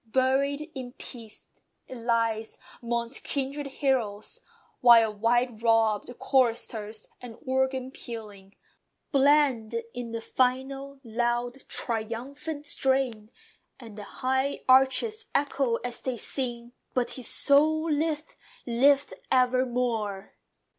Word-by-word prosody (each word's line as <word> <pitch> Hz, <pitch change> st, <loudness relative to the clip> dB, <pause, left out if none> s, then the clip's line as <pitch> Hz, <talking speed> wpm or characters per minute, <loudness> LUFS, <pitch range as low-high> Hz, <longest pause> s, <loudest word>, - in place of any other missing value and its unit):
"Buried 275 Hz, +5 st, +1 dB
in 255 Hz, -2 st, -7 dB
peace," 230 Hz, -6 st, -9 dB, 0.4 s
it 260 Hz, -, -8 dB
lies, 230 Hz, -2 st, 0 dB, 0.2 s
'mongst 235 Hz, +1 st, -2 dB
kindred 280 Hz, +1 st, -3 dB
heroes: 265 Hz, -, -1 dB, 0.4 s
While 230 Hz, -3 st, +7 dB
white 230 Hz, +2 st, +1 dB
robed 225 Hz, -2 st, +2 dB
choristers, 225 Hz, -4 st, 0 dB
and 240 Hz, -2 st, -9 dB
organ 260 Hz, 0 st, 0 dB
pealing, 210 Hz, -6 st, -9 dB, 0.6 s
Blend 270 Hz, -5 st, +3 dB
in 245 Hz, -1 st, -5 dB
the 230 Hz, 0 st, -4 dB
final, 270 Hz, +3 st, -1 dB
loud, 240 Hz, +2 st, -2 dB
triumphant 250 Hz, +7 st, -3 dB
strain, 265 Hz, -7 st, 0 dB, 0.5 s
And 225 Hz, -5 st, -11 dB
the 210 Hz, -, -7 dB, 0.2 s
high 265 Hz, +2 st, +1 dB
arches 270 Hz, -, +4 dB
echo 275 Hz, -4 st, +1 dB
as 245 Hz, -1 st, -4 dB
they 255 Hz, -2 st, -3 dB
sing, 240 Hz, -1 st, -4 dB, 0.2 s
"But 250 Hz, -1 st, +1 dB
his 255 Hz, -3 st, -4 dB
soul 310 Hz, +2 st, +4 dB
liveth! 305 Hz, +1 st, -1 dB, 0.3 s
LIVETH 270 Hz, +4 st, +3 dB, 0.2 s
EVERMORE!" 245 Hz, -5 st, +1 dB
250 Hz, 105 wpm, -27 LUFS, 230-270 Hz, 0.6 s, While